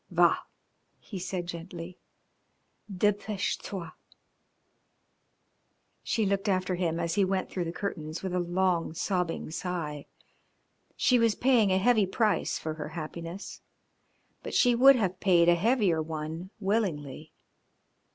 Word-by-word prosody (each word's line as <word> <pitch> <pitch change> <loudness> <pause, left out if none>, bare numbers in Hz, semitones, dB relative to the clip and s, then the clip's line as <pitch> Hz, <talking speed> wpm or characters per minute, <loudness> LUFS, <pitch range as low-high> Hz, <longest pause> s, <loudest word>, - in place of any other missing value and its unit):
"Va," - - +4 0.6
he 195 - -8
said 180 -1 -3
gently, 170 +1 -8 0.9
"depeche 205 +1 0
toi." 180 -5 -6 2.1
She 220 - 0
looked 200 +1 0
after 185 -1 +1
him 170 -2 -1
as 170 -1 -1
he 205 - +3
went 190 0 -1
through 180 -2 -2
the 165 - -3
curtains 165 -4 -5
with 190 -2 -3
a 180 - +1
long, 175 -2 0
sobbing 180 -3 -2
sigh. 160 -4 -4 0.9
She 250 -1 +4
was 230 -2 +3
paying 235 -6 +3
a 185 - +3
heavy 215 0 +3
price 215 +2 +1
for 155 - -4
her 155 -1 -6
happiness, 165 +3 -7 0.8
but - - -6
she 245 -1 +5
would 270 +3 +7
have 190 -6 -1
paid 175 -3 +4
a 175 - +7
heavier 195 -3 +2
one 160 +3 -5
willingly. 160 - -2
185 Hz, 130 wpm, -29 LUFS, 165-200 Hz, 2.1 s, would